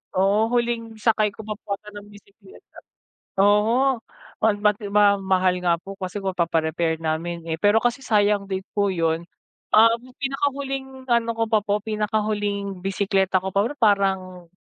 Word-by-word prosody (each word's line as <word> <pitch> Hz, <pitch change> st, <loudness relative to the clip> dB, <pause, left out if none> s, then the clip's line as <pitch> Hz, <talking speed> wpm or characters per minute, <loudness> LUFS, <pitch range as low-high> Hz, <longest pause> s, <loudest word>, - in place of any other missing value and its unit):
oo, 195 Hz, +3 st, +3 dB
huling 235 Hz, -2 st, -1 dB
sakay 215 Hz, -1 st, +2 dB
ko 220 Hz, -, -9 dB
pa 215 Hz, 0 st, -4 dB
po 200 Hz, -, -3 dB
ata 210 Hz, +1 st, -14 dB
ng 205 Hz, 0 st, -10 dB
bisekleta 200 Hz, -1 st, -17 dB, 0.6 s
oho, 225 Hz, +6 st, +3 dB, 0.4 s
oh 220 Hz, -1 st, +4 dB
mati 210 Hz, 0 st, +1 dB
ma 205 Hz, 0 st, +5 dB
mahal 185 Hz, -1 st, +1 dB
nga 170 Hz, -1 st, +2 dB
po 195 Hz, +3 st, -10 dB
kasi 190 Hz, +1 st, -6 dB
kung 195 Hz, -1 st, -3 dB
papa-repair 165 Hz, -1 st, 0 dB
namin, 165 Hz, +1 st, -3 dB
eh. 165 Hz, -, -3 dB
Pero 205 Hz, +2 st, +4 dB
kasi 245 Hz, +3 st, 0 dB
sayang 205 Hz, -3 st, +1 dB
din 190 Hz, 0 st, -3 dB
po 200 Hz, -1 st, +1 dB
'yon. 165 Hz, -1 st, -1 dB, 0.4 s
Um, 230 Hz, +2 st, +5 dB, 0.2 s
pinakahuling 270 Hz, -1 st, -3 dB
ano 235 Hz, -2 st, +1 dB
ko 225 Hz, -, +2 dB
pa 220 Hz, -1 st, +2 dB
po, 205 Hz, 0 st, 0 dB
pinakahuling 210 Hz, -3 st, -2 dB
bisekleta 195 Hz, -1 st, +1 dB
ko 190 Hz, 0 st, -4 dB
pa 200 Hz, -, +3 dB, 0.2 s
parang 190 Hz, -5 st, +1 dB
205 Hz, 155 wpm, -23 LUFS, 190-220 Hz, 0.6 s, ma